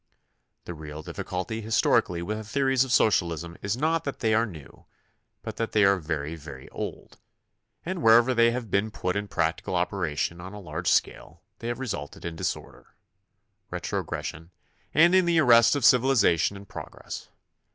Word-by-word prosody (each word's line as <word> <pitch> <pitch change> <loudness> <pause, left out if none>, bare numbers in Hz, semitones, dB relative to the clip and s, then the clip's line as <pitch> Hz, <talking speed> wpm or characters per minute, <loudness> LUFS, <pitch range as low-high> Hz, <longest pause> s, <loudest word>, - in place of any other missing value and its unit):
The 90 - -6
real 75 -1 -8
difficulty 105 +8 -4
his 110 +1 0
torically 85 -1 +2
with 105 +4 -3
the - - -6
theories 135 +3 +2
of 130 - -5
socialism 85 - +2
is 100 +3 -2
not 160 +3 +1
that 140 - -4
they 110 -2 +1
are 115 +2 +3
new, 80 - -13 0.6
but - - -6
that 115 - -3
they 105 - +4
are 100 0 +5
very, 75 -1 -3
very 70 -4 -10
old, - - -7 0.7
and 180 0 -3
wher 115 -2 +7
ever 120 +2 +3
they 115 -1 +5
have 115 -2 -4
been 100 +2 +1
put 90 -3 -3
in 105 0 -2
practical 80 +1 -1
operation 85 -2 -1
on 95 +3 -9
a 105 - -8
large 85 -2 -6
scale - - -1 0.2
they 115 - -6
have 120 0 -2
resulted 100 - -6
in 85 -1 -4
disorder, - - -5 0.7
retrogres - - -4
sion, 80 +1 -7 0.4
and 170 +3 +5
in 185 -1 +5
the 170 -1 +2
arrest 120 -4 +6
of 140 -5 0
civilization 115 - +4
and 100 0 -12
progress. - - -8
105 Hz, 175 wpm, -26 LUFS, 85-120 Hz, 0.7 s, wher